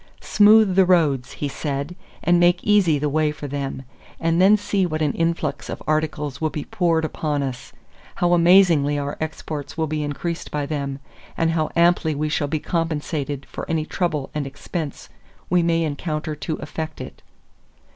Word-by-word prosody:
"Smooth 210 -1 +5
the 190 - +6
roads," 155 -8 +2
he 145 - -3
said, 140 +3 -4 0.3
"and 175 0 +4
make 175 0 +3
easy 200 -7 +4
the 150 +1 -1
way 150 +1 +1
for 150 -1 -7
them, 140 -1 -4 0.4
and 165 +1 +2
then 200 +3 +6
see 205 -1 0
what 155 -3 -1
an 145 - +1
influx 165 -4 -2
of - - -6
articles 150 -2 -1
will 155 - +1
be 150 -1 -5
poured 165 -3 +1
upon 150 -2 -2
us; 130 -2 -6 0.4
how 175 0 +2
amazingly 170 -5 +5
our 145 0 -3
exports 155 -1 -5
will 160 - +1
be 155 0 -2
increased 155 +3 -4
by 145 -1 -2
them; 140 -2 -3 0.4
and 165 0 +2
how 155 -2 0
amply 170 -2 +3
we 155 +2 -1
shall 150 -1 0
be 155 +2 -1
compensated 150 -4 -2
for - - -8
any 160 -2 0
trouble 160 -6 -2
and 150 -2 -2
expense 150 +2 -6 0.4
we 180 -1 +4
may 165 0 +1
encounter 155 0 -3
to 150 +2 -4
effect 155 +1 -6
it." - - -9
155 Hz, 175 wpm, -22 LUFS, 145-170 Hz, 0.4 s, the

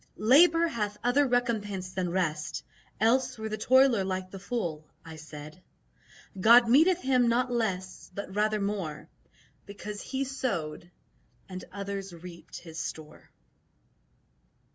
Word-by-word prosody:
"Labour 330 +9 +5
hath 210 -8 -3
other 270 +4 +3
recompense 210 -7 -1
than 185 -2 -1
rest, 165 -4 -2 0.4
Else 255 +4 +2
were 220 0 -5
the 215 - -2
toiler 260 -3 +4
like 185 0 -3
the 195 - -8
fool," 185 -8 -3 0.2
I 160 -1 -9
said; 155 +2 -11 0.8
"God 235 +4 +7
meteth 325 +9 +5
him 255 -2 +3
not 245 +2 +1
less, 190 -6 -3
but 200 -1 -6
rather 215 +1 +1
more 200 -7 -4 0.6
Because 205 +1 -7
he 270 0 -3
sowed 175 - -3 0.6
and 185 -1 -7
others 200 -1 -5
reaped 170 0 -11
his 165 -2 -9
store." 155 -1 -7
205 Hz, 125 wpm, -28 LUFS, 180-245 Hz, 0.8 s, God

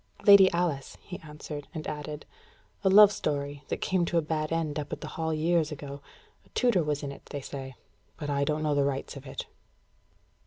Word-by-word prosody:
"Lady 200 -2 +9
Alice," 170 -6 -1
he 180 - -7
answered, 150 -2 -8
and 155 - -4
added: 150 0 -5 0.6
"A 190 - +4
love 205 +1 +9
story, 145 -5 -3
that - - -3
came 185 -2 +1
to 170 0 0
a - - +4
bad 155 0 -2
end 160 -2 -1
up 145 - -6
at - - -4
the - - -6
Hall 160 0 -2
years 160 0 +1
ago. 140 -1 -7 0.4
A - - -25
tutor 240 -8 +3
was 150 -1 -2
in 140 - -3
it, 140 - -12
they 145 - -5
say. 135 -1 -7 0.4
But 150 - -5
I 140 0 +1
don't 150 +2 0
know 150 -1 +1
the 145 -1 +3
rights 140 0 -2
of 140 0 -10
it." 130 - -5
150 Hz, 205 wpm, -28 LUFS, 145-170 Hz, 0.6 s, Lady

